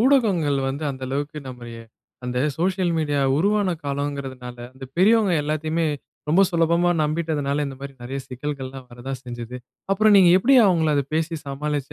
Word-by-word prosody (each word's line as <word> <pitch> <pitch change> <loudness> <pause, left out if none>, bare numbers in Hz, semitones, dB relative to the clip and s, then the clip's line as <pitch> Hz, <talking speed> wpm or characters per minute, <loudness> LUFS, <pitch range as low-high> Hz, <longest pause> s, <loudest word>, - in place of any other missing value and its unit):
ஊடகங்கள் 205 - +3
வந்து 140 +3 -4
அந்த 130 -1 -8
அளவுக்கு 145 +3 -3
நம்மைய 120 -2 -9 0.5
அந்த 125 0 -2 0.2
சோசியல் 180 0 0
மீடியா 145 -2 0 0.2
உருவான 200 +4 +2 0.2
காலம்ங்கறதனால 140 -3 -4 0.2
அந்த 130 0 -10
பெரியவங்க 205 -1 +4
எல்லாத்தையுமே 155 +2 -1 0.4
ரொம்ப 180 +6 +5
சுலபமா 170 0 +2
நம்பிட்டதுனால, 150 -2 -1
இந்த 135 -1 -7
மாதிரி 140 0 -7
நிறைய 135 +3 -4
சிக்கல்கள் 135 +1 -5
எல்லாம் 130 -1 -10
வரத்தான் 125 +2 -6
செஞ்சது. 120 0 -7 0.4
அப்புறம் 215 +1 +4
நீங்க 180 -3 +7
எப்படி 270 +7 +4
அவங்கள 160 -4 +3
அத 140 - +2
பேசி 165 +1 0
சமாளிச்சு 145 0 -3
150 Hz, 150 wpm, -23 LUFS, 135-170 Hz, 0.5 s, நீங்க